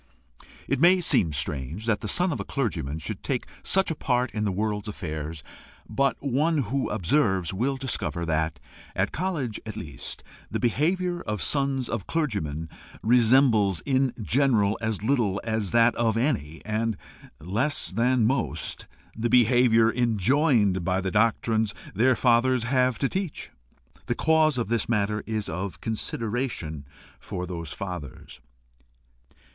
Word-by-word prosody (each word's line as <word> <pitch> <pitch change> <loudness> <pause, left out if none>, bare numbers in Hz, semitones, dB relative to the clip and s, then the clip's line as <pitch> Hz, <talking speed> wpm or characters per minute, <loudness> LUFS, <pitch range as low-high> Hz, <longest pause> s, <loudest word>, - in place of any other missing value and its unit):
It - - 0
may 180 +4 +6
seem 95 - +3
strange 70 - -2
that 110 -3 +1
the - - -4
son 175 - +1
of - - -3
a - - -2
clergyman 85 - -2
should 80 - -5
take - - -2 0.2
such 190 -2 +1
a - - -2
part 125 -3 0
in 105 0 -2
the 100 - +1
world's 105 +1 -2
affairs, 80 -5 -5 0.4
but 140 0 +1
one 145 +5 +1 0.2
who 140 -1 0
observes 95 - +1
will 130 +8 0
discover 85 - -2
that, 80 0 -1 0.4
at - - 0
college 155 - -2
at 110 -1 -7
least, 75 -5 -6 0.3
the - - -2
behaviour 175 +8 0
of 105 -1 -3
sons 135 -3 +1
of 110 -5 -4
clergymen 100 - -2 0.4
resembles 115 - +4
in 135 -1 +1
general 110 -3 +2
as 110 -2 -2
little 110 -6 +1
as 110 -3 -1
that 115 +4 +4
of 115 -2 +1
any, 105 - -1
and 110 0 -1 0.4
less 110 - -1
than - - -11
that 125 +2 +2
of - - +4
most, 130 -1 -2 0.3
the 115 +2 -1
behaviour 115 -1 +5
enjoined 115 - +2
by 90 +1 +1
the 95 -1 -2
doctrines 110 -1 +1 0.2
their 125 +6 +3
fathers 125 0 +3
have 125 -1 +2
to 135 - +1
teach. 190 -2 -4 0.6
The - - 0
cause 155 -3 +3
of 120 - -1
this 115 -1 0
is - - -19
matter 105 -2 0 0.2
of 90 +4 -4
consideration 110 - -3 0.3
for 90 - -5
those 85 -3 -5
fathers. 90 -8 -7
115 Hz, 150 wpm, -26 LUFS, 95-130 Hz, 0.6 s, may